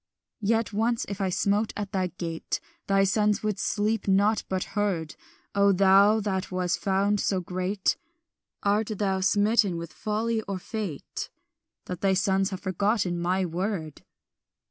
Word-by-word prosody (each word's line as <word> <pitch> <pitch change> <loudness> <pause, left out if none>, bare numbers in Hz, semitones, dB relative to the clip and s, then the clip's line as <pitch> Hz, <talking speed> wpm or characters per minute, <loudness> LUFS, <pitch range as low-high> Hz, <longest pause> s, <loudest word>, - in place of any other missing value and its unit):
"Yet 225 +1 +1
once 225 +3 +1
if 200 0 -5
I 190 - +1
smote 205 +4 +1
at 205 -1 -4
thy 185 -2 0
gate, 170 -2 -4 0.3
Thy 195 0 +4
sons 210 +1 +2
would 210 -3 -1
sleep 215 +1 0
not, 205 +3 +3
but 185 -1 0
heard; 190 -7 -1 0.4
O 200 0 +4
thou 195 +3 +5
that 190 -2 -2
wast 180 -1 0
found 200 +1 +1
so 190 -1 +1
great, 185 +2 -1 0.7
Art 205 +1 +2
thou 195 -2 0
smitten 205 -1 +3
with 170 0 -7
folly 220 +1 -1
or 195 -1 -2
fate 190 -5 -5 0.6
That 180 -2 -6
thy 195 -1 +3
sons 195 0 +2
have 190 -1 -6
forgotten 190 -1 0
my 185 +2 +1
word? 175 -2 -3
195 Hz, 145 wpm, -27 LUFS, 185-210 Hz, 0.7 s, thou